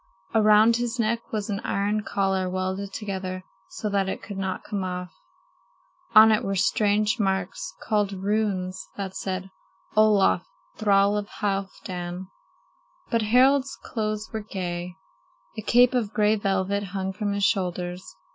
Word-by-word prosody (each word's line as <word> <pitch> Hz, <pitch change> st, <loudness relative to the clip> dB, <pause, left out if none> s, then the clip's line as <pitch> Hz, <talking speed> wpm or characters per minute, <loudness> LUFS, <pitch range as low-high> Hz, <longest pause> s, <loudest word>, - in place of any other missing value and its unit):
Around 215 Hz, +1 st, +5 dB
his 240 Hz, +1 st, -2 dB
neck 230 Hz, 0 st, -1 dB
was 210 Hz, -2 st, -2 dB
an 200 Hz, -, -2 dB
iron 205 Hz, -1 st, 0 dB
collar 190 Hz, -2 st, 0 dB
welded 185 Hz, +2 st, -3 dB
together 190 Hz, -3 st, -4 dB, 0.3 s
so 215 Hz, -, -5 dB
that 200 Hz, -2 st, 0 dB
it -, -, -5 dB
could 200 Hz, -2 st, -6 dB
not 190 Hz, -1 st, -3 dB
come 205 Hz, -3 st, -3 dB
off. 180 Hz, -1 st, -5 dB, 1.0 s
On 220 Hz, +1 st, +9 dB
it 215 Hz, -, +2 dB
were 195 Hz, 0 st, -1 dB
strange 210 Hz, +3 st, +2 dB
marks, 190 Hz, -2 st, -2 dB
called 210 Hz, -2 st, +1 dB
runes, 195 Hz, -2 st, -1 dB
that 195 Hz, -2 st, -5 dB
said: 190 Hz, 0 st, -4 dB, 0.4 s
"Olaf, 210 Hz, -4 st, +4 dB, 0.3 s
thrall 200 Hz, -1 st, +3 dB
of 205 Hz, -1 st, -2 dB
Halfdan." 190 Hz, -2 st, -3 dB, 0.9 s
But 230 Hz, -2 st, +2 dB
Harald's 260 Hz, +5 st, +4 dB
clothes 215 Hz, -1 st, -3 dB
were 220 Hz, -, -1 dB
gay. 180 Hz, -3 st, -5 dB, 0.6 s
A -, -, -4 dB
cape 245 Hz, +4 st, +4 dB
of 225 Hz, -4 st, -1 dB
gray 210 Hz, -1 st, +3 dB
velvet 195 Hz, -1 st, 0 dB
hung 190 Hz, -1 st, -4 dB
from 205 Hz, 0 st, -2 dB
his 200 Hz, 0 st, -1 dB
shoulders. 180 Hz, -2 st, -1 dB
200 Hz, 140 wpm, -25 LUFS, 190-215 Hz, 1.0 s, On